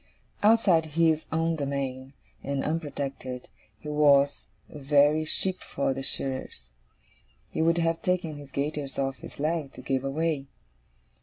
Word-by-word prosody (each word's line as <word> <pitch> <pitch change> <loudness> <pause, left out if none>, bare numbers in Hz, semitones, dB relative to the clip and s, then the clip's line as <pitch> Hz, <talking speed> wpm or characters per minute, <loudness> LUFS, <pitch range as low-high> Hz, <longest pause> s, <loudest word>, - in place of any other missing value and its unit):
Outside 205 -7 +5
his 160 -2 +3
own 165 +1 +1
domain, 135 -2 -3 0.3
and 140 -1 -2
unprotected, 140 -5 -4 0.3
he - - -10
was 145 -2 +4 0.2
a 150 - -10
very 145 +2 +4
sheep 185 +4 0
for 135 -1 -1
the 135 - -5
shearers. 130 - -3 0.8
He - - -1
would 165 +1 +3
have 165 -1 +1
taken 175 -4 -1
his 145 -2 -11
gaiters 140 0 -3
off 135 -1 -1
his - - -11
legs, 155 -2 -1
to 130 - -10
give 130 0 0
away. 145 0 -1
145 Hz, 140 wpm, -27 LUFS, 135-160 Hz, 0.8 s, Outside